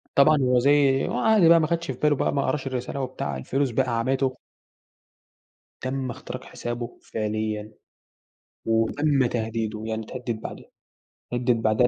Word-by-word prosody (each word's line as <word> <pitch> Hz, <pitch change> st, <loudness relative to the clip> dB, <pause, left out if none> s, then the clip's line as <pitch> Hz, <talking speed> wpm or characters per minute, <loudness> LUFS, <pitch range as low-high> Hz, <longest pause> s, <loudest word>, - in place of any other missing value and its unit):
طبعا 150 Hz, +2 st, +6 dB
هو 125 Hz, -1 st, +3 dB
زي 135 Hz, 0 st, +4 dB
هو -, -, -2 dB
عادي 215 Hz, -7 st, +5 dB
بقى 165 Hz, 0 st, +7 dB
ما 155 Hz, -, +2 dB
اخدش 170 Hz, -1 st, -1 dB
في 130 Hz, -, -5 dB
باله 150 Hz, -2 st, +3 dB
بقى -, -, 0 dB
ما 140 Hz, -, +1 dB
قراش 135 Hz, +1 st, -1 dB
الرسالة، 130 Hz, +1 st, -3 dB
بتاع، 75 Hz, -, -4 dB
الفلوس 135 Hz, -, -1 dB
بقى 120 Hz, -1 st, 0 dB
عمته. 130 Hz, +2 st, 0 dB, 1.4 s
تم 130 Hz, -1 st, -2 dB
اختراق -, -, -7 dB
حسابه 120 Hz, 0 st, -6 dB
فعليًا، 110 Hz, 0 st, -3 dB, 0.9 s
وتم 130 Hz, +5 st, +2 dB
تهديده 110 Hz, -2 st, -2 dB
يعني 110 Hz, 0 st, -2 dB
اتهدد 120 Hz, -2 st, -5 dB
بعدها، -, -, -8 dB, 0.6 s
اتهدد 120 Hz, -2 st, +1 dB
بعدها 110 Hz, +3 st, +3 dB
125 Hz, 145 wpm, -25 LUFS, 115-140 Hz, 1.4 s, بقى